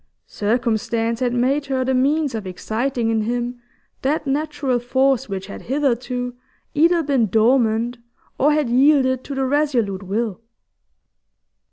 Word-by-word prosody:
Circumstance 230 +1 -1
had 250 -2 0
made 265 +4 +1
her 260 -1 0
the 260 - +1
means 280 +2 +1
of 215 -4 -4
exciting 225 +5 -2
in 220 -1 +1
him 240 +2 -3 0.4
that 295 +3 0
natural 285 -2 -1
force 260 0 +1
which 195 -1 -4
had 200 - -9
hitherto 250 -2 -1 0.4
either 335 +2 +3
been 270 -6 +2
dormant 230 +2 +2 0.4
or 295 +3 +4
had 300 -3 +1
yielded 260 0 +3
to 280 - -5
the 270 0 0
resolute 255 -9 0
will. 210 +2 -3
250 Hz, 135 wpm, -21 LUFS, 230-275 Hz, 0.4 s, or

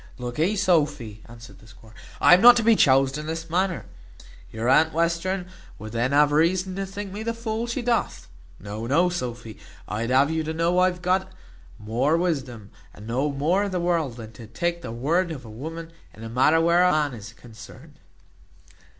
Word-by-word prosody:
"Lookee, 140 - -2
Sophy," 150 - 0
answered 115 0 -14
the 110 - -18
squire, 110 0 -18 0.3
"I - - +6
am 180 - +6
not 245 +1 +9
to 230 - +1
be 225 0 +5
choused 135 -3 +3
in 150 - -7
this 165 0 -5
manner. 185 0 -1 0.7
Your 110 +2 -4
aunt 155 +5 +4
Western 170 +3 -1 0.3
would 110 +1 -9
then 120 +3 -1
have 145 +1 +4
reason 180 +5 +1
to 195 0 -3
think 200 0 -7
me 210 - -6
the 230 +1 -3
fool 230 0 -4
she 240 +1 -3
doth. 235 -1 -1 0.3
No, 105 +3 -7
no, 170 +8 +2
Sophy, 120 - -6 0.3
I'd 110 +4 -3
have 135 +4 +3
you 160 0 -1
to 160 +1 -5
know 170 +2 +1
I 185 - +5
have 180 -1 -3
a - - -17
got 190 +1 0 0.5
more 120 +9 0
wisdom, 130 - -3 0.2
and 105 - -12
know 130 +6 -1
more 155 +8 0
of 205 -1 -2
the 180 - -2
world, 170 -7 -1
than 110 -2 -9
to 115 0 -12
take 170 +10 -3
the 120 - -7
word 160 +10 0
of 145 -6 -8
a 110 - -11
woman 165 +8 -8 0.2
in 110 - -12
a 115 - -7
matter 130 +7 +3
where 170 +2 +3
a 180 - +4
man 150 -3 0
is 110 -1 -10
concerned." 115 -1 -15
155 Hz, 200 wpm, -24 LUFS, 120-180 Hz, 0.7 s, not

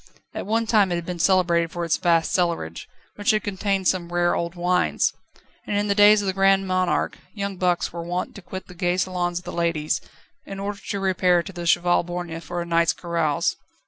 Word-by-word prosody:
At - - -5
one 225 +2 +1
time 210 -4 +3
it - - +1
had 170 -1 -4
been 180 -1 -5
celebrated 170 -2 +3
for 175 0 -3
its 165 - +1
vast 170 -2 +2
cellarage, 170 - -1 0.3
which 205 +3 -1
had 215 -1 +3
contained 195 -2 -1
some 175 -2 0
rare 175 0 +2
old 170 +1 -3
wines. 180 +1 +1 0.5
And 205 - 0
in 205 0 0
the - - +4
days 205 0 +6
of - - -3
the 190 - 0
Grand 195 0 +3
Monarch 185 -1 0 0.2
young 200 -1 -3
bucks 180 -2 0
were 170 - -5
wont 175 +2 -3
to 200 - -10
quit 190 +1 -8
the - - -13
gay 175 +1 0
salons 180 -1 -1
of 175 - -6
the 180 - -5
ladies, 165 -3 0 0.4
in 195 0 -8
order 200 0 -4
to 200 - -2
repair 180 -2 +2
to 195 - -9
the 175 -1 -5
Cheval 175 0 +3
Borgne 175 -1 -5
for 175 +2 -4
a - - -9
night's 170 -1 +2
carouse. 165 -4 -1
180 Hz, 215 wpm, -23 LUFS, 170-195 Hz, 0.5 s, days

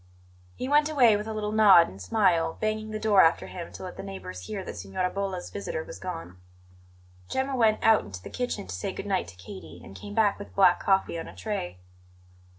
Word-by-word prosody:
He 255 - -4
went 295 +2 +4
away 250 -8 +5
with 210 +1 -3
a - - -3
little 210 -1 -3
nod 205 -6 +7
and 95 - -11
smile, 165 - +2
banging 215 0 -2
the 215 - -3
door 210 -3 +4
after 165 - +3
him 175 -2 -8
to - - -9
let 185 - -8
the - - -5
neighbours 90 -2 -8
hear 200 -3 -4
that - - -7
Signora 100 - -3
Bolla's 195 -2 -4
visitor - - -4
was - - -10
gone. 165 - -7 0.9
Gemma 265 +1 -1
went 220 -3 +3
out 220 -1 +5
into 95 -3 -8
the - - -9
kitchen 250 - -3
to 90 - -7
say 95 - -4
good - - -6
night 195 -2 0
to 90 - -12
Katie, 90 -2 -11
and 95 - -12
came 205 - -9
back 215 -3 +2
with 205 - -10
black 185 -3 +5
coffee 190 -3 +1
on 165 - -6
a - - -11
tray. 145 - -4
195 Hz, 220 wpm, -27 LUFS, -, 0.9 s, nod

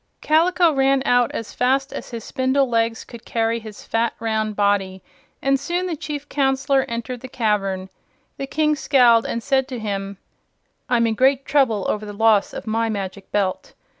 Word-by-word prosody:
Kaliko 335 +2 +3
ran 270 0 +2
out 245 -2 +3
as 230 - -6
fast 270 +2 +1
as - - -7
his 230 -3 -6
spindle 260 +1 +1
legs 230 -1 0
could 235 -2 -12
carry 230 0 -1
his 215 -2 -11
fat, 230 0 -1
round 220 -1 -1
body, 200 -2 0 0.4
and 275 0 +2
soon 350 +6 -2
the 350 -3 -2
Chief 290 -1 -6
Counselor 270 -1 +1
entered 235 +1 -5
the 260 - -7
cavern. 200 -6 -1 0.5
The 275 - -4
King 305 +2 +1
scowled 245 -5 +4
and 230 - -3
said 265 -1 +1
to 255 -2 -5
him: 200 -2 -4 0.7
"I'm 235 -2 +3
in 225 - +1
great 265 +3 +2
trouble 260 -8 +2
over 210 - -1
the 205 - -7
loss 215 -1 +3
of - - -7
my 225 +1 0
Magic 200 -2 -5
Belt. 195 -3 -2
235 Hz, 175 wpm, -21 LUFS, 215-270 Hz, 0.7 s, scowled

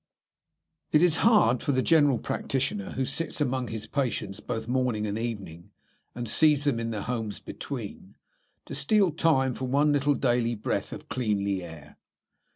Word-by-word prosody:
It 150 - +5
is 170 -3 +4
hard 205 - +4
for 145 - 0
the 130 0 +1
general 145 -6 +4
practitioner 150 - -2
who 130 - -1
sits 165 +5 -3
among 130 -3 0
his 110 -1 -5
patients 110 -6 -2
both 115 -2 -4
morning 125 -4 0
and 105 -1 -2
evening, 100 -8 -5 0.5
and 120 -1 -4
sees 150 +4 +3
them 140 -6 +1
in 115 0 -2
their 110 -3 -3
homes 115 -4 -3
between, - - -7 0.5
to - - -8
steal 200 +1 +2
time 145 -5 +2
for 130 - -4
one 145 +4 +3
little 145 0 +2
daily 120 -2 +1
breath 105 - -2
of - - -8
cleanly 100 -5 -1
air. 80 -4 -11
125 Hz, 160 wpm, -27 LUFS, 110-145 Hz, 0.5 s, It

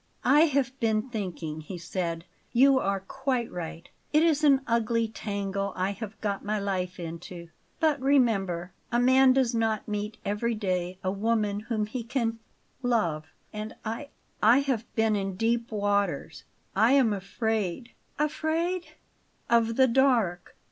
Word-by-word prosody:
"I 290 +6 +6
have 280 -4 +1
been 220 +2 0
thinking," 175 -8 -4
he 175 +4 -7
said. 170 -1 -3 0.3
"You 265 +2 +6
are 195 -3 -1
quite 255 +3 -2
right; 170 0 -6 0.2
it 305 +1 +4
is 315 -2 +2
an 275 -2 +5
ugly 230 -1 +1
tangle 200 -2 -3
I 185 +2 0
have 215 +1 -7
got 200 -2 -2
my 215 +1 -1
life 185 -2 -2
into. 170 +1 -7 0.3
But 310 -5 +2
remember, 195 -11 +2 0.2
a 240 - +2
man 260 +1 +6
does 255 -2 +2
not 225 -2 0
meet 210 0 -3
every 215 +3 0
day 185 -3 -2
a 185 - 0
woman 210 0 0
whom 215 0 -2
he 235 +3 -5
can 230 -1 -1 0.4
love; 210 -12 0 0.3
and 215 +1 -6
I 230 +6 -4 0.3
I 235 +6 +6
have 255 -5 -2
been 220 -1 +2
in 195 -2 -2
deep 230 +3 0
waters. 200 -6 -1 0.3
I 220 +6 +5
am 255 -6 +4
afraid 215 +2 -2
" - - -40
"Afraid 325 +4 -1 0.3
" - - -40
"Of 230 -1 +3
the 260 +1 +5
dark. 230 -8 +2
220 Hz, 155 wpm, -27 LUFS, 195-250 Hz, 0.4 s, I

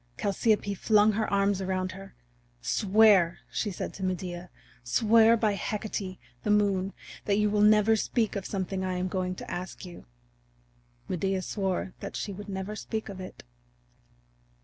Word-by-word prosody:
Chalciope 205 0 +1
flung 210 +2 +4
her 215 +1 -1
arms 200 -1 +2
around 185 0 -1
her. 195 -2 -11 0.4
"Swear," 200 - +4
said 205 -5 -3
she - - -10
to 190 - -6
Medea, 180 -1 -3 0.3
"swear 225 - +5
by 215 -2 +1
Hecate, 200 -1 -4 0.2
the - - -3
Moon, 200 -2 +2 0.3
that 200 -1 +2
you 210 0 +2
will 210 0 +2
never 210 +1 +5
speak 220 0 0
of 195 -2 -3
something 190 -1 -3
I 185 -1 -2
am 180 +1 -1
going 185 0 -2
to - - -8
ask 180 +1 -6
you." 175 -1 -11 1.0
Medea 190 +1 -1
swore 190 -2 -2
that - - -7
she 200 - -3
would 205 +2 -9
never 190 +2 -4
speak 220 0 -4
of 195 -1 -8
it. 185 - -10
195 Hz, 155 wpm, -28 LUFS, 185-210 Hz, 1.0 s, swear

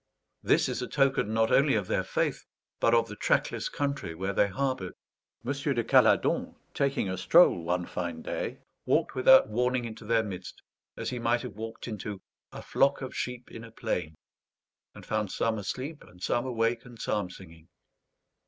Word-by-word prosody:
This - - +3
is - - -3
a - - -3
token, 135 -6 +1
not 110 0 +2
only 140 -2 +4
of 105 -3 0
their - - 0
faith, - - -1 0.4
but 115 - +4
of 115 -1 +3
the 105 - -8
trackless - - 0
country 140 - -3
where 95 +3 -2
they 100 - +3
harboured. 105 -3 -2 0.5
M. 130 - 0
de 140 -4 -1
Caladon, - - +3 0.2
taking 140 -6 0
a 95 -1 -3
stroll 160 - +5
one 90 +1 -1
fine 85 -3 -4
day, - - -4 0.3
walked - - +2
without 130 -2 +6
warning 125 +2 0
into 110 -1 -8
their 115 +1 +2
midst, 95 -4 -8 0.3
as - - -3
he 125 - -3
might 120 +1 +1
have - - -6
walked 115 +3 -7
into 105 -3 -5 0.3
"a - - -9
flock 140 0 +2
of 130 - -6
sheep 125 -1 -4
in 115 - -9
a 115 - -10
plain," 90 -8 -3 0.8
and - - -11
found 110 -2 -1
some 115 -1 0
asleep 130 +9 -5
and 90 +1 -15
some 120 +2 0
awake 115 -1 0
and 120 -2 -13
psalm 105 -4 -1
singing. 85 -3 -13
115 Hz, 180 wpm, -29 LUFS, 95-125 Hz, 0.8 s, without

